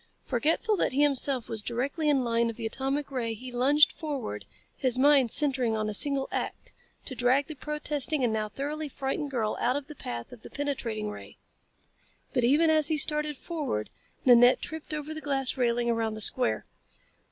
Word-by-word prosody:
Forgetful 400 +8 +1
that - - 0
he 285 +2 +3
himself 275 -3 +2
was 225 -2 -2
directly 275 +8 -1
in 275 -3 +3
line 235 -1 +1
of 230 - -5
the 230 - -6
atomic 270 +5 -2
ray 230 -4 -2
he 250 +3 -9
lunged 280 +5 +4
forward, 275 - -5 0.3
his 255 -3 +1
mind 275 -2 +5
centering 260 -4 +1
on 215 0 -1
a 215 - -3
single 275 +4 +2
act - - -4 0.3
to 265 - -4
drag 255 +3 +2
the 310 - -7
protesting 300 0 -1
and 235 -3 +1
now 215 -1 -2
thoroughly 295 +6 -4
frightened 275 +2 -3
girl 225 -5 -1
out 250 +2 +2
of 285 -1 -3
the 300 - -10
path 120 - -6
of 245 - -12
the - - -11
penetrating 235 -7 -3
ray. - - -11 1.0
But 250 - +1
even 300 +6 +4
as 310 -2 +3
he 315 - 0
started 300 0 +1
forward 295 - -4 0.3
Nanette 245 0 +7
tripped 320 0 -7
over 305 0 -4
the 315 - -6
glass 270 -3 0
railing 240 -2 +1
around 225 -2 0
the 215 - -5
square. 250 +4 +1
270 Hz, 185 wpm, -28 LUFS, 235-295 Hz, 1.0 s, Nanette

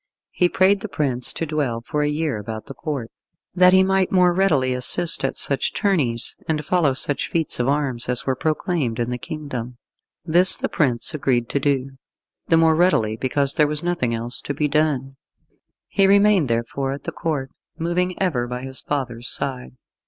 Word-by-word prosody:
He 180 - +1
prayed 195 +3 +3
the 215 - -5
prince 130 - +5
to 165 - -3
dwell 145 -7 -2
for 150 - -2
a 150 - 0
year 150 -6 -2
about 110 +1 -7
the 135 - -9
Court, 140 -7 -5 0.4
that 180 0 +5
he 190 0 +5
might 190 -1 +1
the - - -3
more 180 -1 +4
readily 155 -9 +1
assist 160 +7 +2
at 135 - -2
such 140 -2 +1
tourneys 145 - 0
and 155 -2 -2
follow 165 -6 +1
such 140 +2 -1
feats 165 -6 -1
of 120 - 0
arms 135 -4 -1
as 125 0 -1
were 130 - 0
proclaimed 155 -5 -2
in 120 +1 -2
the 125 - -4
kingdom. 125 -5 -6 0.5
This 175 +3 +5
the - - -3
prince 130 -1 0
agreed 125 -5 -1
to 140 - -1
do 135 -1 -2 0.5
the 165 - +3
more 160 0 +4
readily 155 -11 +2
because 135 +3 -1
there 150 -3 +3
was 150 +1 -2
nothing 170 -9 -1
else 120 +2 -4
to 145 - -5
be 150 - 0
done. 140 -3 -1 0.7
He 195 -1 +2
remained 200 -5 +4
therefore 120 +4 -2
at 140 - -9
the - - -4
Court, 145 -6 -4 0.3
moving 175 +2 -2
ever 140 -11 -1
by 125 +1 -6
his 130 0 -1
father's 125 -4 -3
side. 130 -2 -4
145 Hz, 190 wpm, -21 LUFS, 125-170 Hz, 0.7 s, prince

